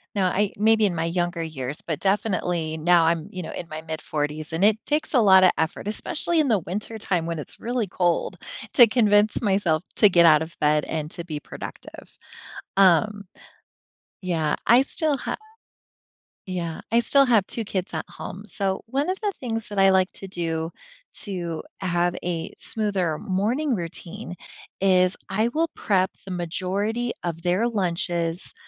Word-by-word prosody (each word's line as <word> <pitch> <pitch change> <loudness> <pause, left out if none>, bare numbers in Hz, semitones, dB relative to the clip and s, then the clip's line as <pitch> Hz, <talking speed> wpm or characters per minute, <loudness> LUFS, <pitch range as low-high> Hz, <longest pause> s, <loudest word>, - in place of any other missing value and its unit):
No, 195 - +1
I 195 +2 +1
maybe 220 0 +4
in 175 - -3
my 165 +1 -1
younger 175 0 -1
years, 140 -3 -5
but 160 -4 -3
definitely 180 -5 0
now 170 +1 +4
I'm, 165 -1 +1
you 185 -1 -6
know, - - -6
in 170 - -6
my 155 +1 -7
mid 160 -1 -5
40s, 150 +1 -3
and 170 +5 +2
it 220 +1 +3
takes 300 +1 -1
a 250 - +5
lot 190 -2 +7
of 185 - +7
effort, 160 +5 -2
especially 325 +9 -1
in 305 - +3
the 220 -5 +3
wintertime 190 -2 -3
when 165 -1 -3
it's 150 - -9
really 240 -1 -1
cold, 175 -2 0 0.4
to 240 -3 +8
convince 210 -2 +3
myself 190 -5 +1
to 210 - +7
get 170 -2 +5
out 155 -2 +6
of 170 +1 -7
bed 150 0 +2
and 155 -1 -3
to 170 - -5
be 155 -3 -5
productive. - - -10 0.7
Um 200 +2 +4 1.0
Yeah. 160 -4 0
I 240 +3 +6
still 300 +1 +2
ha - - -3 1.1
Yeah. 175 -4 -4
I 235 - +6
still 275 +4 +6
have 225 -6 +3
2 230 -2 -4
kids 185 -3 -3
at 160 - -3
home, 200 +3 -8
so, 195 -1 -2
one 275 +7 -1
of 375 - -1
the 410 -2 -1
things 225 -3 -3
that 205 -1 -3
I 195 - +6
like 190 0 +3
to 195 - -8
do, 165 -2 -3 0.5
to 175 -5 -4 0.2
have 175 -1 0
a 170 -1 -3
smoother 195 -8 -1
morning 235 - 0
routine, 180 +2 -7 0.5
is 185 -1 +3
I 215 +4 +1
will 320 +6 0
prep 190 -2 +1
the 195 - -7
majority 195 +7 -2
of 170 -1 -3
their 185 +6 +1
lunches 175 -5 -1
185 Hz, 170 wpm, -24 LUFS, 165-215 Hz, 1.1 s, to